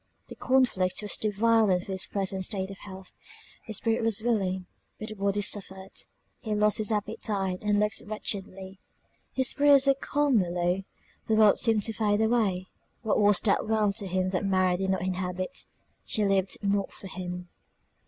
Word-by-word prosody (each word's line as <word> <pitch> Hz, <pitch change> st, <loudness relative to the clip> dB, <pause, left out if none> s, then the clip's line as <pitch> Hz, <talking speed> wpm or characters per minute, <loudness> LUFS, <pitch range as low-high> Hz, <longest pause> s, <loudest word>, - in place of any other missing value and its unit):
The -, -, -9 dB
conflict 235 Hz, -8 st, +1 dB
was 210 Hz, -, +1 dB
too 215 Hz, -, -1 dB
violent 210 Hz, -3 st, +2 dB
for -, -, -7 dB
his 190 Hz, 0 st, -1 dB
present 195 Hz, -1 st, -2 dB
state 190 Hz, -1 st, -3 dB
of 195 Hz, -, -11 dB
health; 190 Hz, -2 st, -10 dB, 0.5 s
the 220 Hz, -, -5 dB
spirit 225 Hz, +3 st, 0 dB
was 225 Hz, -2 st, +2 dB
willing, 190 Hz, -5 st, 0 dB, 0.3 s
but 215 Hz, -, -7 dB
the -, -, -6 dB
body 200 Hz, 0 st, -1 dB
suffered; 190 Hz, -1 st, 0 dB, 0.5 s
he 215 Hz, -3 st, -3 dB
lost 210 Hz, +1 st, +3 dB
his 215 Hz, 0 st, -1 dB
appetite, 200 Hz, -3 st, -2 dB
and 210 Hz, -1 st, +1 dB
looked 210 Hz, 0 st, +1 dB
wretchedly; 195 Hz, -2 st, -4 dB, 0.5 s
his 260 Hz, -1 st, 0 dB
spirits 285 Hz, -1 st, +5 dB
were 275 Hz, -, +5 dB
calmly 270 Hz, -8 st, +1 dB
low 175 Hz, +2 st, 0 dB, 0.5 s
the 220 Hz, -, +2 dB
world 215 Hz, -2 st, +5 dB
seemed 225 Hz, -3 st, +2 dB
to 225 Hz, -, -2 dB
fade 210 Hz, -1 st, +1 dB
away 220 Hz, -5 st, +1 dB, 0.4 s
what 220 Hz, -, +1 dB
was 205 Hz, -2 st, +4 dB
that 210 Hz, 0 st, +1 dB
world 215 Hz, -2 st, +2 dB
to 205 Hz, -4 st, -1 dB
him 185 Hz, 0 st, 0 dB
that 185 Hz, 0 st, -1 dB
Mary 185 Hz, -2 st, +2 dB
did 190 Hz, +1 st, -2 dB
not 190 Hz, -1 st, 0 dB
inhabit; 185 Hz, +4 st, -3 dB, 0.4 s
she 215 Hz, -2 st, 0 dB
lived 195 Hz, -1 st, +1 dB
not 200 Hz, 0 st, 0 dB
for -, -, -13 dB
him. 180 Hz, -1 st, -6 dB
200 Hz, 175 wpm, -27 LUFS, 190-220 Hz, 0.5 s, spirits